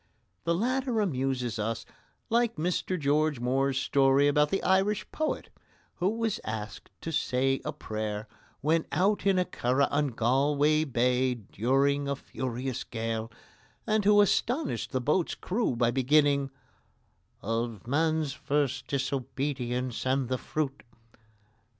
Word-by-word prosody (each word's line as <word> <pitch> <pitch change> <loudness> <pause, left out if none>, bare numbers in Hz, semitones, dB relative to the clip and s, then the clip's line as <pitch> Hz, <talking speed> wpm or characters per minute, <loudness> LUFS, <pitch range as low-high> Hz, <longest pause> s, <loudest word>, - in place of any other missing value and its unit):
The 170 - +2
latter 250 +3 0
amuses 130 - -1
us 110 +1 -2 0.5
like 235 0 +2
Mr 180 +2 -1
George 150 -1 +1
Moore's 135 +2 +1
story 135 +1 +3
about 150 +1 +3
the 195 - -1
Irish 195 +2 +2
poet 310 0 -2 0.5
who 180 +2 +1
was 225 0 -1
asked 110 -1 -6
to 165 - -4
say 135 -2 +1
a - - -2
prayer 110 0 -4 0.3
when 160 +3 +1
out 200 +2 +1
in 195 -1 +4
a 180 - +2
curragh 130 0 +1
on 145 0 +2
Galway 145 +6 +2
Bay 125 -1 +1
during 135 +6 0
a 140 - 0
furious 130 -1 -4
gale, 115 -1 -3 0.5
and 215 -1 +1
who 205 +1 +6
astonished 245 - 0
the 130 -3 -1
boat's 155 +7 +1
crew 210 - -1
by 120 0 +2
beginning: 140 +2 +3 0.9
"Of 115 -1 -2
man's 155 +2 +1
first 140 -2 -1
disobedience 130 -2 -2
and 130 -1 +1
the 130 -1 -1
fruit." 140 -3 -3
140 Hz, 130 wpm, -29 LUFS, 125-165 Hz, 0.9 s, who